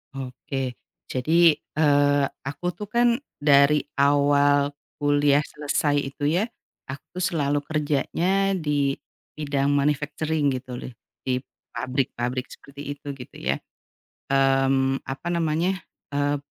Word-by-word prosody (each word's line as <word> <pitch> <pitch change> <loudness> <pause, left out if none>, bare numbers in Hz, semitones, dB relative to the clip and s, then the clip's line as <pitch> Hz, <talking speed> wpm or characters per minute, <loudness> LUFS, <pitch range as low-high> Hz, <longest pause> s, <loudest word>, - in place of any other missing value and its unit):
Oke. 130 0 -4 0.3
Jadi, 160 +5 +4
eee, 145 -2 +2 0.2
aku 145 +5 -6
tuh 210 - -5
kan 235 +2 +3 0.2
dari 145 0 +5 0.2
awal 145 0 +4 0.3
kuliah 145 0 +4
selesai 145 0 -1 0.2
itu, 145 -1 0
ya, 210 - +2 0.4
aku 140 +6 -9
selalu 145 -5 +1
kerjanya 165 +6 +1
di 145 -6 +1 0.4
bidang 145 -2 0
manufacturing, 150 +1 +1
gitu 125 -1 -5
loh, 125 - -7 0.3
di 125 -1 0 0.3
pabrik-pabrik 130 -1 -2
seperti 140 +1 -8
itu, 145 0 -10
gitu, 125 - -11
ya. - - 0 0.7
Mmm, 135 0 +3
apa 135 +5 -7
namanya, 170 +3 0 0.3
eee, 145 0 +1
145 Hz, 110 wpm, -25 LUFS, 135-150 Hz, 0.7 s, dari